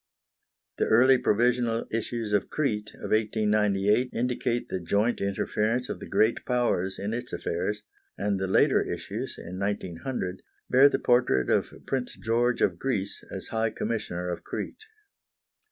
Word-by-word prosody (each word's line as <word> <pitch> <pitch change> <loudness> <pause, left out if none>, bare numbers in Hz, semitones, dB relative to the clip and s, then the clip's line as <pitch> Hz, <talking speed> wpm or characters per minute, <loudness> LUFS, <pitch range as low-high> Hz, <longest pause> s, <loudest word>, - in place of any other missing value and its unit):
The - - +2
early 130 +3 +6
provisional 120 +1 +2
issues 115 -1 -2
of 105 - +1
Crete 110 -8 -1
of - - -7
1898 105 +1 +2
indicate 120 0 -1
the 95 - -3
joint 105 +7 +1
interference 105 +5 0
of - - -4
the - - -8
Great 110 +2 +2
Powers 120 -7 0
in 105 +3 -3
its 120 +1 -4
affairs, 105 0 -2 0.3
and 100 -1 0
the 95 - -1
later 95 - +4
issues, - - -5
in 90 +2 -7
1900, 95 0 -3 0.3
bear 135 +3 +7
the - - 0
portrait 120 - +2
of - - +2
Prince 130 -2 -3
George 120 +2 +1
of 85 -3 +1
Greece 105 -7 -2
as - - -7
High 110 0 0
Commissioner 105 -6 -3
of 90 - -4
Crete. 435 - -6
110 Hz, 145 wpm, -27 LUFS, 100-120 Hz, 0.3 s, bear